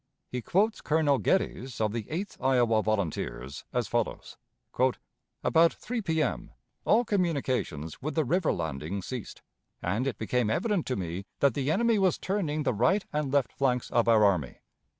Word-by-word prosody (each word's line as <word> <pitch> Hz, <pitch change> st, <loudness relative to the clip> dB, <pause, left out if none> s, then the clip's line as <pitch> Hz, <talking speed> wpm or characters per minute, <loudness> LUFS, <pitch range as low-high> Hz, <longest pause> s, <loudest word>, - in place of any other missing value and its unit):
He 125 Hz, -, -3 dB
quotes 210 Hz, -, +1 dB
Colonel 150 Hz, -3 st, +2 dB
Geddes, 130 Hz, -9 st, 0 dB
of 110 Hz, -1 st, +1 dB
the 115 Hz, -3 st, -4 dB
Eighth 185 Hz, +6 st, -4 dB
Iowa 120 Hz, -4 st, +3 dB
Volunteers, 80 Hz, -, -2 dB
as -, -, -1 dB
follows: -, -, -2 dB, 1.1 s
"About 165 Hz, +1 st, +4 dB
3 240 Hz, 0 st, -4 dB
P.M. 160 Hz, -, -1 dB, 0.4 s
all 235 Hz, +3 st, +4 dB
communications 135 Hz, -, -1 dB
with 150 Hz, +1 st, -3 dB
the 160 Hz, -2 st, +2 dB
river 170 Hz, +5 st, +2 dB
(landing) 80 Hz, +4 st, -3 dB
ceased, 125 Hz, -2 st, -7 dB, 0.4 s
and 105 Hz, +9 st, -1 dB
it 125 Hz, -6 st, -2 dB
became 115 Hz, 0 st, 0 dB
evident 185 Hz, -, 0 dB
to 130 Hz, -, 0 dB
me 90 Hz, +1 st, -4 dB
that 140 Hz, -3 st, +4 dB
the 140 Hz, +2 st, -1 dB
enemy 225 Hz, +5 st, +3 dB
was 190 Hz, -2 st, +3 dB
turning 165 Hz, -6 st, -1 dB
the 135 Hz, -, +1 dB
right 130 Hz, -, +2 dB
and 150 Hz, -3 st, -1 dB
left 140 Hz, -3 st, +1 dB
flanks 125 Hz, -3 st, 0 dB
of 120 Hz, -1 st, +2 dB
our 110 Hz, -2 st, +6 dB
army. 90 Hz, -10 st, +1 dB
130 Hz, 160 wpm, -28 LUFS, 110-165 Hz, 1.1 s, our